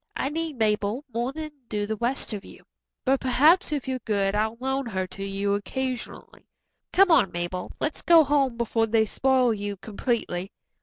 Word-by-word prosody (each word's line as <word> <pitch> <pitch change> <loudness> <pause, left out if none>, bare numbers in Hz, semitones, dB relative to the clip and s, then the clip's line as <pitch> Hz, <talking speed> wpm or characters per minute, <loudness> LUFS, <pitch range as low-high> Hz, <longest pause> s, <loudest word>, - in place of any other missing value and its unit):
"I 270 - -1
need 320 -2 -3
Mabel 215 +4 0
more 240 +3 -1
than 310 +1 -6 0.2
do 210 -1 -1
the 220 +1 -2
rest 240 +2 -1
of 205 -1 -5
you, - - -14 0.4
but 270 0 +3
perhaps 300 +8 +4
if 285 -3 -2
you're 260 -1 -2
good 200 -4 0
I'll 220 +2 0
loan 265 0 -1
her 190 -4 -2
to 195 +2 -7
you 195 +1 -1
occasionally. 255 +5 -5 0.4
Come 390 -1 +5
on, 195 - +5
Mabel, 175 +1 -4
let's 305 - -2
go 335 -2 +7
home 275 -4 +1
before 225 -1 +1
they 220 0 +3
spoil 255 +1 +2
you 205 -1 -4
completely." 200 -3 -3
235 Hz, 175 wpm, -26 LUFS, 205-270 Hz, 0.4 s, go